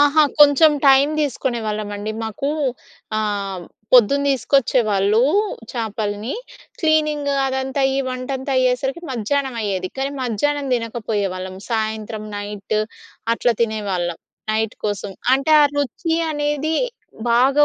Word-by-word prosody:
అహా! 290 +2 +5 0.2
కొంచం 295 +2 +7
టైం 270 +1 +6
తీసుకునేవాళ్ళమండి. 215 -6 -2
మాకూ 225 +6 -2 0.7
ఆహ్, 200 -4 -2 0.3
పొద్దున 255 +3 +6
తీసుకొచ్చేవాళ్ళూ 225 -6 +2 0.5
చేపలని. 215 -1 -3 0.5
క్లీనింగు 305 -3 +2
అదంతా 265 +1 -1
అయ్యి 270 0 +1
వంటంతా 260 +2 -3
అయ్యేసరికి 255 +5 0
మధ్యానమయ్యేది, 230 -6 -1
కానీ 270 +1 -1
మధ్యానం 280 +4 -1
తినకపోయేవాళ్ళం. 205 -5 -3
సాయంత్రం, 220 -1 -2
నైట్ 205 0 -4 0.6
అట్లా 240 0 +1
తినేవాళ్ళం, 195 -6 -2 0.3
నైట్ 220 0 0
కోసం. 205 -1 -3 0.2
అంటే, 275 +3 0
ఆ - - +7
రుచి 290 +3 -1 0.2
అనేది 295 +1 -1 0.6
బాగా 270 +5 +5
240 Hz, 100 wpm, -20 LUFS, 210-275 Hz, 0.7 s, కొంచం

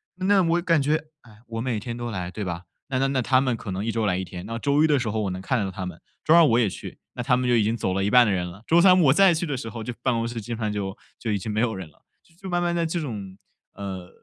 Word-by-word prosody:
那 190 +1 +3
我 170 +1 +2
感 165 -4 +2
觉， 150 +3 +2 0.3
唉， 110 -3 -18
我 115 -1 -4
每 115 -3 -1
天 115 +2 -5
都 120 -1 -4
来， 90 -4 -4
对 105 +2 -5
吧？ 85 0 -4 0.3
那 130 -1 0
那 135 - +2
那 135 -1 0
他 130 +2 +3
们 130 -3 +1
可 105 -3 -7
能 95 +3 -3
1 115 - 0
周 115 -1 -1
来 95 -3 +1
1 95 - -3
天。 90 0 -8
那 115 0 -4
周 145 +5 +2
一 160 - +5
的 145 -3 +3
时 115 -3 -2
候 110 +1 -1
我 100 - -1
能 90 0 -5
看 110 +2 0
到 95 - -3
他 95 0 -5
们， 90 -2 -8 0.2
周 155 - +5
二 170 0 +8
我 120 -3 +4
也 110 - +3
去， 90 - -9
那 125 - -4
他 125 +1 +3
们 125 - -1
就 120 - +4
已 110 - +4
经 110 +3 0
走 95 -4 -1
了 95 0 0
一 100 - +1
半 125 +2 +7
的 100 - +2
人 90 -2 -1
了， 100 +6 -13
周 170 +1 +5
三 185 -1 +7
我 135 -3 +5
再 195 0 +6
去 165 +2 -1
的 145 - -2
时 120 -3 -5
候 115 +1 -7
就 120 +2 -4
办 130 - +2
公 115 0 -1
室 115 -1 -5
基 120 +3 -9
本 115 - -5
上 105 -1 -1
就 100 +1 -4 0.2
就 115 - -3
已 100 - +1
经 105 +3 -6
没 110 - 0
有 115 -2 +1
人 95 -4 -7
了。 75 - -29 0.4
就 190 - -6
慢 175 0 +1
慢 175 0 0
在 170 -1 +1
这 170 +1 -2
种， 100 -9 -6 0.4
呃， 95 -2 -6
115 Hz, 345 characters per minute, -25 LUFS, 100-140 Hz, 0.4 s, 二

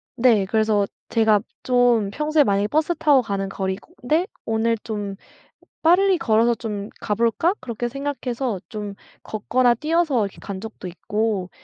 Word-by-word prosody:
네. 230 -5 +4
그래서 215 -1 +2 0.2
제가 220 -2 +3 0.2
좀 245 -5 +3
평소에 300 +3 +2
만약에 200 -3 +1
버스 310 +6 +1
타고 285 -4 +4
가는 195 -3 -3
거리고 190 - -4
인데 310 +8 +2 0.2
'오늘 225 +1 +1
좀 205 -3 -5 0.7
빨리 370 +3 +4
걸어서 235 -5 +3
좀 210 -3 -5
가볼까?' 230 - +1
그렇게 240 0 -3
생각해서 260 -5 -3
좀 210 -2 -5 0.3
걷거나 240 +3 +1
뛰어서 305 -4 +1
이렇게 195 - -9
간 195 -2 -6
적도 220 -4 -8
있고 210 0 -2
225 Hz, 300 characters per minute, -22 LUFS, 205-265 Hz, 0.7 s, 네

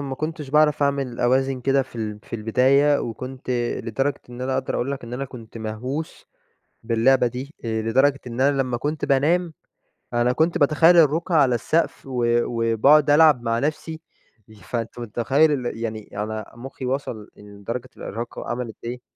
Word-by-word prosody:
ما 135 -2 -4
كنتش 155 -1 -5
باعرف 150 0 +3
أعمل 140 -4 -1
أوازن 130 +1 +1
كده 135 +2 +2
في 130 - -14
ال 105 -2 -4
في - - -6
البداية، 135 +6 +3
وكنت 130 +3 -6 0.3
لدرجة 135 +4 -1
إن 120 +1 -9
أنا 130 +1 -2
أقدر 130 0 -2
أقول 130 +3 -1
لك 140 -3 -5
إن 120 - -10
أنا 135 +2 -3
كنت 120 -4 -11
مهووس 125 +8 -5 0.6
باللعبة 120 +3 +3
دي. 130 +5 -7
آآ، 110 -1 -1
لدرجة 135 +5 +2
إن 120 +1 -4
أنا 140 0 +3
لمّا 125 -2 -2
كنت 150 +4 -2
بانام 160 +5 +2 0.6
أنا 120 +1 +2
كنت 165 +6 +1
باتخيّل 160 +3 +5
الرقع 165 +2 +3
على 135 -5 +4
السقف، 155 +6 -1
و 125 -2 -2 0.2
وباقعد 120 +6 +3
ألعب 150 -4 +6
مع 115 -1 0
نفسي. 155 +3 -3 0.5
ي 110 - -15
فأنت 115 +4 -5
متخيّل 120 +7 +2
ال 115 - -4
يعني 110 -2 -5
أنا 110 0 -5
مخّي 130 +1 -7
وصل 125 -5 -3
لدرجة 105 +5 -7
الإرهاق 115 +4 -6
وعملت 120 -2 -4
إيه؟ 125 +1 -5
130 Hz, 165 wpm, -23 LUFS, 115-145 Hz, 0.6 s, ألعب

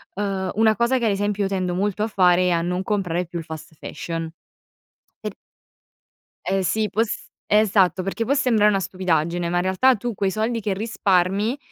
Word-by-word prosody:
Uhm, 195 -2 -2
una 220 0 +4
cosa 235 +3 +2
che, 240 - -1
ad 220 - +3
esempio, 205 0 -1
io 195 - 0
tendo 185 -2 -1
molto 205 +3 -1
a - - 0
fare 180 -3 +3
è - - +3
a 170 -1 +2
non 180 +2 -2
comprare 180 -4 -1
più 170 0 -6
il 160 - -8
fast 160 0 -9
fashion. 165 +1 -5 0.9
E - - -2
p - - -14 1.1
Eh 195 0 +1
sì, 215 +4 0
può 220 - 0
s 230 - -6 0.2
esatto, 195 -3 +3
perché 210 +4 -2
può 275 - +2
sembrare 230 -6 +3
una 200 -2 +3
stupidaggine, 175 -2 -1
ma 175 +1 0
in - - +2
realtà 190 +8 +3
tu 235 +2 -4
quei 195 0 0
soldi 220 +3 -1
che 205 -2 -1
risparmi, 200 +1 +1
195 Hz, 200 wpm, -22 LUFS, 180-215 Hz, 1.1 s, una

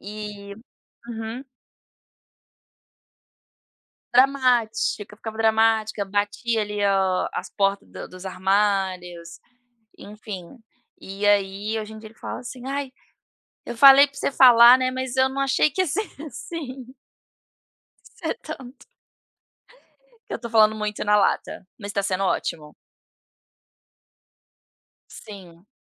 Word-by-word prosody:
E 205 0 -8 0.5
uhum. 225 +2 -6 2.7
Dramática, 245 -5 +2
eu - - -23
ficava 220 0 -8
dramática, 220 -1 +2
batia 205 +3 -1
ali 210 0 -5
o 190 -2 +1
as - - -5
porta 195 -1 0
do - - -10
dos 185 +1 -12
armários, 185 -3 -1 0.6
enfim. 205 0 -10 0.4
E 195 +2 -4
aí 205 +2 +1
hoje 215 0 -8
em 220 - -10
dia 220 - -11
ele 220 - -21
fala - - -6
assim: 245 0 -9
"Ai, 275 0 -3 0.8
eu - - -6
falei 275 +3 +8
para 280 0 -20
você 280 - -2
falar, 245 -1 +8
né, 255 0 0
mas 260 0 -4
eu 260 0 +4
não 270 +1 -4
achei 275 +2 +2
que 375 +7 0
ia - - -2
ser 410 +7 -2 0.2
assim." 270 -2 -8 1.3
Ser - - -4
tanto. 260 +1 -10 1.4
Que - - -5
eu - - -4
tô 235 - -6
falando 220 -1 +4
muito 210 -1 -4
na 210 0 +3
lata, 195 -1 -1
mas 205 -2 -7
tá 200 - -1
sendo 195 0 -1
ótimo. 155 -5 -3 2.3
Sim. 185 -3 -13
215 Hz, 120 wpm, -23 LUFS, 200-250 Hz, 2.7 s, falei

